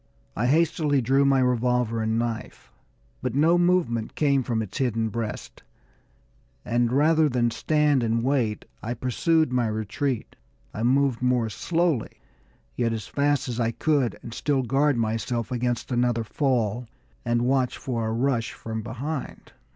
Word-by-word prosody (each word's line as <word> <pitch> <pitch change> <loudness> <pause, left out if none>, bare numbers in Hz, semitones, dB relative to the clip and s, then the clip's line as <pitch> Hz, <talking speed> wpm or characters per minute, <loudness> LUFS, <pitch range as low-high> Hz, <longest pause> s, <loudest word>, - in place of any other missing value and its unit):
I 120 - 0
hastily 155 -1 +2
drew 135 +3 +3
my 135 -1 +4
revolver 125 -2 +1
and 110 0 0
knife; 115 -1 -4 0.5
but 125 -1 -3
no 165 +5 +4
movement 170 -11 +1
came 140 -3 +2
from 115 -3 -1
its 105 - -7
hidden 115 -4 0
breast, 115 -1 -5 1.0
and 120 0 +1
rather 155 +3 +4
than 120 -2 +1
stand 150 0 +2
and 115 0 0
wait, 125 -5 0 0.2
I 120 +3 -3
pursued 155 +5 +1
my 125 -2 +2
retreat. 110 +4 -3 0.4
I 105 - -5
moved 130 0 +2
more 125 -3 +1
slowly, 165 - -1 0.6
yet 115 -2 0
as 110 -2 -4
fast 145 -1 0
as 120 -1 -4
I 115 -1 +1
could 140 0 0
and 115 - -8
still 140 0 0
guard 135 +3 +2
myself 115 +2 -2
against 125 0 -2
another 120 -1 +1
fall 120 -2 -1 0.4
and 120 0 +1
watch 130 0 +1
for 115 -4 -3
a - - -1
rush 120 -1 0
from 110 -1 -5
behind. 130 +6 -6
125 Hz, 150 wpm, -25 LUFS, 115-140 Hz, 1.0 s, my